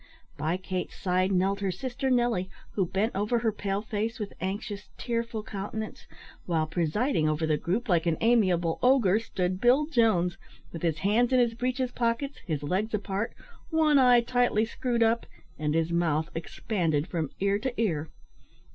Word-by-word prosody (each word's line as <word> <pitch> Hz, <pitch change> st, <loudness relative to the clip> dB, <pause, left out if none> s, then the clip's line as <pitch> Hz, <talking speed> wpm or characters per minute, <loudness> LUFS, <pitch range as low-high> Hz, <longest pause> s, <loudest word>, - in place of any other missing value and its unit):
By 160 Hz, +4 st, -1 dB
Kate's 185 Hz, -1 st, -4 dB
side 185 Hz, +1 st, +1 dB
knelt 195 Hz, +1 st, +1 dB
her 200 Hz, -1 st, -1 dB
sister 250 Hz, +8 st, -3 dB
Nelly, 240 Hz, -7 st, +1 dB, 0.2 s
who 190 Hz, -4 st, 0 dB
bent 200 Hz, +6 st, -1 dB
over 210 Hz, +5 st, +1 dB
her 225 Hz, -1 st, +1 dB
pale 200 Hz, -1 st, -2 dB
face 220 Hz, +1 st, -2 dB
with 210 Hz, -2 st, -5 dB
anxious, 200 Hz, -1 st, -4 dB
tearful 230 Hz, +6 st, -2 dB
countenance, 215 Hz, +1 st, -6 dB, 0.4 s
while, 165 Hz, -3 st, +1 dB
presiding 165 Hz, -, 0 dB
over 155 Hz, +1 st, 0 dB
the 155 Hz, -1 st, +2 dB
group, 195 Hz, -, -2 dB
like 175 Hz, -3 st, +2 dB
an 165 Hz, -, +2 dB
amiable 185 Hz, -8 st, +2 dB
ogre, 240 Hz, -6 st, +4 dB
stood 185 Hz, -4 st, -2 dB
Bill 255 Hz, +5 st, +5 dB
Jones, 220 Hz, -, +2 dB, 0.3 s
with 165 Hz, -, -7 dB
his 165 Hz, -3 st, 0 dB
hands 235 Hz, +5 st, +3 dB
in 255 Hz, -, +5 dB
his 240 Hz, -2 st, +3 dB
breeches 250 Hz, +2 st, -1 dB
pockets, 245 Hz, +4 st, -1 dB
his 150 Hz, -4 st, -2 dB
legs 195 Hz, +8 st, 0 dB
apart, 200 Hz, +1 st, -3 dB, 0.3 s
one 310 Hz, -3 st, +4 dB
eye 250 Hz, -2 st, +6 dB
tightly 240 Hz, -2 st, +2 dB
screwed 235 Hz, 0 st, 0 dB
up, 225 Hz, +1 st, +1 dB, 0.3 s
and 150 Hz, 0 st, 0 dB
his 165 Hz, 0 st, +1 dB
mouth 160 Hz, -2 st, +1 dB
expanded 165 Hz, -3 st, -1 dB
from 160 Hz, -5 st, -2 dB
ear 200 Hz, +1 st, +2 dB
to 245 Hz, +1 st, -4 dB
ear. 160 Hz, -9 st, 0 dB
200 Hz, 165 wpm, -28 LUFS, 175-235 Hz, 0.4 s, eye